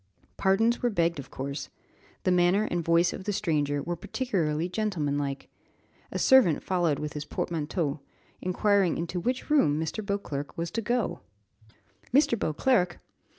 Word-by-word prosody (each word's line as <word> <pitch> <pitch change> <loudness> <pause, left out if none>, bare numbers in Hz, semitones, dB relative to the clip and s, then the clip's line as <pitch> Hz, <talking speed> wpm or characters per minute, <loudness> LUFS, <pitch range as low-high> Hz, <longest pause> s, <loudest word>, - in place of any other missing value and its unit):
Pardons 225 +5 +2
were 245 - +2
begged 170 -6 +1
of 135 - -8
course. 140 +2 -5 0.5
The 185 - +2
manner 180 +3 +4
and 175 -1 0
voice 170 +1 +3
of 190 - -7
the 205 - 0
stranger 145 -7 0
were 175 - -2
particularly 170 -6 -1
gentlemanlike. 145 -9 -2 0.6
A - - -3
servant 255 - +5
followed 175 -6 +1
with 150 +1 -4
his 150 - -4
portmanteau, 155 -1 -2 0.4
inquiring 195 -1 +2
into 170 +2 -3
which 255 - -2
room 155 - +4
Mr. 160 +7 -3
Beauclerc 200 -9 -4
was 170 0 -3
to 230 - -2
go? 230 -6 -1 0.9
"Mr. 270 -2 +4
Beauclerc!" 180 - +1
175 Hz, 145 wpm, -28 LUFS, 150-205 Hz, 0.9 s, servant